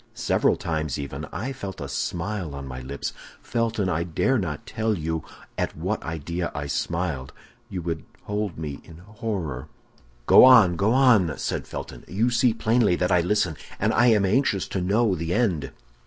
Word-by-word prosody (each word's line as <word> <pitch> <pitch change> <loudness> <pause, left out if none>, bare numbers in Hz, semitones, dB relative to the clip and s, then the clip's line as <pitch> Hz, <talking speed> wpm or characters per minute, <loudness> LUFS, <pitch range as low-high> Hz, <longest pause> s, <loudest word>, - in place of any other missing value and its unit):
Several - - +2
times, 80 -4 -2
even, 70 +1 -5
I 130 +6 -4
felt 100 -8 -7
a - - -5
smile 85 -3 -3
on 70 0 -6
my 65 -1 -7
lips. 70 +2 -5 0.3
Felton, 115 -4 -1
I 85 -3 0
dare 105 +10 +1
not 85 -7 -4
tell 110 -2 -1
you 80 0 -2 0.4
at - - -2
what - - -2
idea 85 +2 -4
I 75 0 -3
smiled; 80 -2 -2 0.4
you 90 -5 -5
would 80 -2 -3 0.2
hold 105 -4 -3
me 75 -3 -5
in 80 - -13
horror—" 95 - -5 0.6
"Go - - +8
on! 115 -9 +8
go 100 +6 +2
on!" 120 -10 +4
said - - -3
Felton; - - -7
"you 105 +10 +1
see 120 +1 +3
plainly 115 -3 +2
that 90 0 0
I 90 - +5
listen, 90 -2 +1 0.2
and - - +2
that - - +1
I 125 - +6
am 105 -4 +4
anxious 100 -1 +1
to 95 - -2
know 105 +3 +2
the 85 0 -2
end." 100 -11 0
90 Hz, 180 wpm, -25 LUFS, 80-110 Hz, 0.6 s, Go